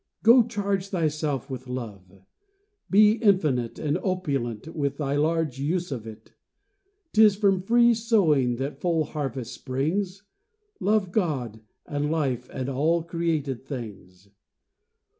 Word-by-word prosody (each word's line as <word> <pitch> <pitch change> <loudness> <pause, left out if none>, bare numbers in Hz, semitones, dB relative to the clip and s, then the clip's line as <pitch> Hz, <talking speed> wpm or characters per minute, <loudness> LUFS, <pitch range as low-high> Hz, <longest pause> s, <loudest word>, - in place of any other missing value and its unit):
Go, 235 +3 +8
charge 200 -4 -2
thyself 155 - -1
with 130 -2 -7
love; 100 -7 -8 0.7
be 210 +2 +6
infinite 155 - +1
And 150 -1 -1
opulent 140 - -2
with 140 -3 -1
thy 140 -2 -1
large 155 -2 0
use 170 +4 -1
of 115 -4 -5
it: 110 -1 -12 0.8
'Tis 215 -2 +6
from 195 -2 +2
free 235 +4 +4
sowing 175 - +2
that 135 +4 -5
full 165 -3 +1
harvest 135 -5 -5
springs; 180 +9 -2 0.6
Love 205 -3 +1
God 135 - -1 0.3
and 145 0 -2
life 135 -6 -1
and 130 -1 -4
all 155 +5 +1
created 160 -6 -2
things. 100 -8 -9
150 Hz, 120 wpm, -25 LUFS, 130-185 Hz, 0.8 s, Go